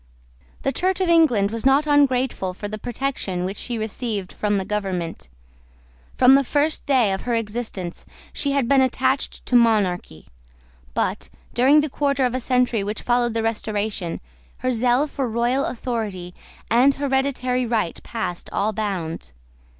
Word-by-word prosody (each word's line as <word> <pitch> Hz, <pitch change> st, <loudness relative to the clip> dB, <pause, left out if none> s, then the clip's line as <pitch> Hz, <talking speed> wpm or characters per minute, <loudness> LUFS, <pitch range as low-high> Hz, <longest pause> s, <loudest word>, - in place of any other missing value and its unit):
The 270 Hz, -, +1 dB
Church 370 Hz, +5 st, 0 dB
of 370 Hz, -2 st, +1 dB
England 250 Hz, -12 st, +4 dB
was 230 Hz, 0 st, -4 dB
not 270 Hz, +3 st, +4 dB
ungrateful 260 Hz, -10 st, +2 dB
for 205 Hz, -, -5 dB
the 215 Hz, +1 st, -6 dB
protection 235 Hz, -7 st, -3 dB
which 195 Hz, +2 st, -4 dB
she 240 Hz, -2 st, -3 dB
received 220 Hz, -3 st, -3 dB
from 205 Hz, -1 st, 0 dB
the 190 Hz, -, -2 dB
government. 185 Hz, -, -3 dB, 0.9 s
From 255 Hz, +1 st, +6 dB
the 275 Hz, 0 st, +5 dB
first 295 Hz, +4 st, 0 dB
day 250 Hz, -8 st, +3 dB
of 190 Hz, -, -3 dB
her 240 Hz, -1 st, -1 dB
existence, 210 Hz, -5 st, -4 dB, 0.3 s
she 280 Hz, -1 st, -1 dB
had 275 Hz, -4 st, +1 dB
been 275 Hz, 0 st, +5 dB
attached 260 Hz, +1 st, 0 dB
to 250 Hz, -, 0 dB
monarchy. 205 Hz, -, +2 dB, 0.7 s
But, -, -, -1 dB, 0.2 s
during 275 Hz, +5 st, +5 dB
the 300 Hz, -, -1 dB
quarter 280 Hz, -2 st, +1 dB
of 245 Hz, -, -1 dB
a 255 Hz, -, -1 dB
century 250 Hz, -4 st, +1 dB
which 210 Hz, +2 st, -4 dB
followed 240 Hz, -1 st, +1 dB
the 225 Hz, -, 0 dB
Restoration, 210 Hz, -5 st, -2 dB, 0.4 s
her 255 Hz, -, +2 dB
zeal 245 Hz, +3 st, +2 dB
for 275 Hz, -4 st, -3 dB
royal 240 Hz, +4 st, +1 dB
authority 215 Hz, -8 st, -4 dB, 0.4 s
and 260 Hz, +4 st, +5 dB
hereditary 265 Hz, -2 st, 0 dB
right 220 Hz, -7 st, -1 dB
passed 220 Hz, -7 st, -5 dB
all 215 Hz, +2 st, 0 dB
bounds. 180 Hz, -, -4 dB
235 Hz, 155 wpm, -22 LUFS, 205-265 Hz, 0.9 s, From